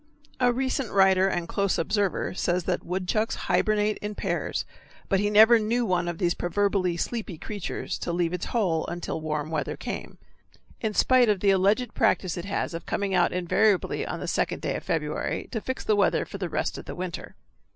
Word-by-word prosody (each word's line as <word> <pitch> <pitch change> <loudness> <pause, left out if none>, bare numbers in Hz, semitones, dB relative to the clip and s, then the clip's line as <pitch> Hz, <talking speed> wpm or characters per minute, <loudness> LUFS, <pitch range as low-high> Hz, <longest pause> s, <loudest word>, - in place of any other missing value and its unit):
A 250 -1 +4
recent 260 0 -1
writer 190 -1 +5
and 175 -3 -1
close 200 +1 0
observer 200 +3 0
says 180 -1 0
that 180 0 -1
woodchucks 190 +5 -1
hibernate 215 -1 +1
in 210 0 -5
pairs, - - -2 0.4
but 195 - +3
he 205 +1 +1
never 220 +3 +7
knew 230 +3 0
one 180 -3 0
of 175 -1 -3
these 175 -1 +1
proverbially 185 -1 0
sleepy 215 -2 -3
creatures 195 -1 -5
to - - -3
leave 170 0 0
its 180 - -3
hole 180 -9 0
until 170 -2 -4
warm 155 0 -3
weather 155 -2 -2
came - - -6 0.6
in 215 -2 -2
spite 255 -3 +5
of 205 -2 +2
the 200 - +4
alleged 205 +5 +2
practice 190 -5 +1
it 175 - -5
has 200 - -2
of 165 - -6
coming 200 -1 -1
out 180 -1 +3
invariably 180 +3 +1
on - - -4
the - - -5
second - - -1
day - - -1
of - - -5
February - - -2
to 225 - -3
fix 260 +3 -4
the 215 - +2
weather 205 - +2
for 200 - -8
the 180 -3 -3
rest - - -2
of - - -10
the - - -7
winter. 180 -2 -6
195 Hz, 195 wpm, -26 LUFS, 175-215 Hz, 0.6 s, never